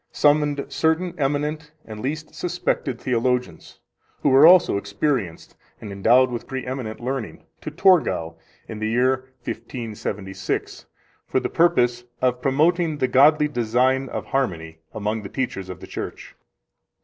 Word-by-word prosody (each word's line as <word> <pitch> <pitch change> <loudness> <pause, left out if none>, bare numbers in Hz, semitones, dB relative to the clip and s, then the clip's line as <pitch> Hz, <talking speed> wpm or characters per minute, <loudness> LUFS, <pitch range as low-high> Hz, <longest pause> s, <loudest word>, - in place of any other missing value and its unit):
summoned 145 -1 +2
certain 165 +2 0
eminent 150 +2 -1
and 110 -1 -9
least 155 +6 -4
suspected 170 -7 -2
theologians, 125 0 -2 0.4
who 145 - +4
were 135 +4 +7
also 180 - +6
experienced 100 - -2 0.2
and 105 - -8
endowed 125 +6 +4
with 120 - -5
preeminent 130 -4 -5
learning, 125 -1 -5 0.2
to - - -5
Torgau 165 - +2 0.3
in 110 - -7
the 110 0 -1
year 130 +2 +1
1576, 100 -5 -5 0.4
for - - +1
the - - -3
purpose 125 -8 +2
of 125 0 0
promoting 155 +4 +2
the 130 - +1
godly 150 +4 +5
design 130 +1 +1
of - - -5
harmony 80 -12 -2
among 110 +1 -3
the 100 - -8
teachers 95 -8 -4
of 90 -1 -8
the - - -8
Church. - - -7
130 Hz, 135 wpm, -23 LUFS, 110-150 Hz, 0.4 s, were